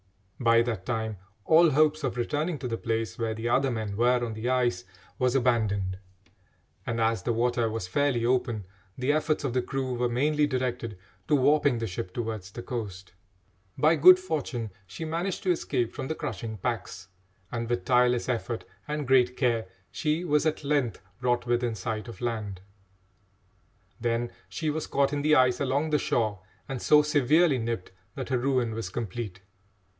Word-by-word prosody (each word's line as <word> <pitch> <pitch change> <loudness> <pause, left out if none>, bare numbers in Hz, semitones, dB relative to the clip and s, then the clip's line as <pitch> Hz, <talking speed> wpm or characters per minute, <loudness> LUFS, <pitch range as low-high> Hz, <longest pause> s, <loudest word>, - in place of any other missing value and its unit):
By 115 -2 +5
that 110 -6 -4
time 110 -3 -2 0.3
all 165 +1 +6
hopes 155 +1 +3
of 125 -3 -2
returning 150 +7 -1
to 125 - -4
the 115 - -2
place 115 0 -2
where 110 -1 -1
the 110 +1 -3
other 135 +3 +2
men 110 -4 -3
were 120 +2 +3
on 115 - -4
the 110 +3 -3
ice 120 -8 +1 0.4
was 125 0 +2
abandoned, 105 -7 +1 0.9
and, 115 0 -1
as 115 0 +1
the 120 - -1
water 120 0 +1
was 110 -4 -4
fairly 125 +2 +1
open, 120 -4 0 0.3
the 130 +3 +1
efforts 155 0 0
of 135 -4 -1
the 130 - +2
crew 130 0 -3
were 120 0 0
mainly 150 +5 +2
directed 125 -5 -2 0.3
to 150 - +4
warping 145 -1 +3
the 115 - -2
ship 90 -2 -5
towards 110 -5 -4
the 120 +4 -8
coast. 100 -6 -6 0.6
By 155 +2 +4
good 180 +5 +9
fortune 140 - -3 0.2
she 160 - -6
managed 170 +4 -2
to 185 - +3
escape 130 -8 -1
from 135 -1 -5
the 160 - -2
crushing 115 -7 -5
packs, 95 -3 -4 0.4
and, 115 -1 -3
with 120 0 -1
tireless 125 -1 +3
effort 120 -2 -2 0.2
and 150 -2 -3
great 125 -1 +4
care, 115 -5 +1 0.2
she 155 +2 -1
was 150 -1 +2
at 155 - -1
length 140 -7 0 0.2
brought 120 -1 +1
within 120 -1 0
sight 110 +3 -4
of 115 - -10
land. 110 -6 -3 1.4
Then 120 0 -1 0.2
she 155 -2 -2
was 155 +1 -3
caught 140 0 +1
in 145 - 0
the 155 +1 +4
ice 125 -2 +4
along 140 +3 0
the 150 - +3
shore 110 -6 0 0.3
and 135 -3 -4
so 150 0 +6
severely 150 0 +3
nipped 115 -4 -3 0.2
that 130 -1 -5
her 130 -2 +1
ruin 125 -3 +1
was 110 -4 -4
complete. 105 -2 -5
125 Hz, 175 wpm, -27 LUFS, 115-145 Hz, 1.4 s, good